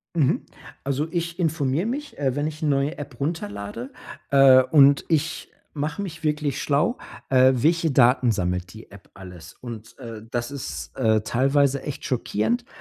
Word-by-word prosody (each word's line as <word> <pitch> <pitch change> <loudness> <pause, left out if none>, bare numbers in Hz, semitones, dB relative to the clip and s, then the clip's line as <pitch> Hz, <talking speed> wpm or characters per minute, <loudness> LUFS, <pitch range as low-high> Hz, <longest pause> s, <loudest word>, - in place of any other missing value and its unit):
Mhm, 145 -6 +2 0.4
also, 140 +3 -1
ich 170 0 -3
informiere 160 +1 0
mich, 285 +4 -5
äh, 135 -2 0
wenn 145 +1 0
ich 155 +1 -6
'ne 155 - +1
neue 140 +4 0
App 140 -4 -8
runterlade. 115 -5 -4 0.4
Äh, 135 -2 +7
und 140 +1 +5
ich 155 -1 -1 0.3
mache 150 +7 -3
mich 160 -4 -7
wirklich 150 -3 -1
schlau. 155 - +1 0.3
Äh, 130 0 +6
welche 165 +5 +2
Daten 125 -1 +4
sammelt 90 -1 -2
die 110 - -13
App 100 -1 -15
alles? 90 -3 -11
Und, 115 -1 -10
äh, 115 -2 -8
das 120 +1 -3
ist, 70 - -6
äh, 110 -3 +2
teilweise 135 +3 +1
echt 145 - -6
schockierend. 135 - -1
140 Hz, 160 wpm, -24 LUFS, 120-155 Hz, 0.4 s, Äh